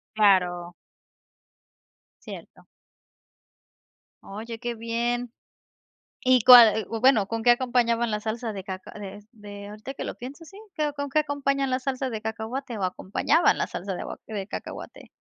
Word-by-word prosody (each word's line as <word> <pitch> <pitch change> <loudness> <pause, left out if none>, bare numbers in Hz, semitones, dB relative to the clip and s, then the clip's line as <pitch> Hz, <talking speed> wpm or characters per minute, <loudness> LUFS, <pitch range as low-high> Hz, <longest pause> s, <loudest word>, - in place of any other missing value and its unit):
Claro. 180 -4 +2 1.5
Cierto. - - -11 1.6
Oye, 225 +3 -8
qué 240 -1 -4
bien, 235 +1 -2 0.9
¿y 255 -2 +4
cuál? 230 -4 +9
U 230 - -3
o - - -4
bueno, 245 -5 +4
¿con 225 +1 -3
qué 245 - +1
acompañaban 240 -2 +1
la 210 0 -2
salsa 225 +1 -4
de 195 -2 -6
caca 185 -1 -7
de 205 0 -9
de 205 -2 -10
ahorita 215 +6 -8
que - - -6
lo - - -5
pienso. 275 +7 -9
Sí, 390 +5 -14 0.2
¿qué? 305 -1 0
O, - - -5
¿con 285 0 -4
qué 305 +3 +2
acompañan 275 -2 -1
la 255 - +1
salsa 260 0 -3
de 220 -2 -4
cacahuate 225 +3 -5
o 200 - -5
acompañaban 195 - +2
la - - -1
salsa 190 +2 -5
de - - -5
agua - - -7
de 205 -3 -5
cacahuate? - - -8
230 Hz, 160 wpm, -25 LUFS, 210-255 Hz, 1.6 s, cuál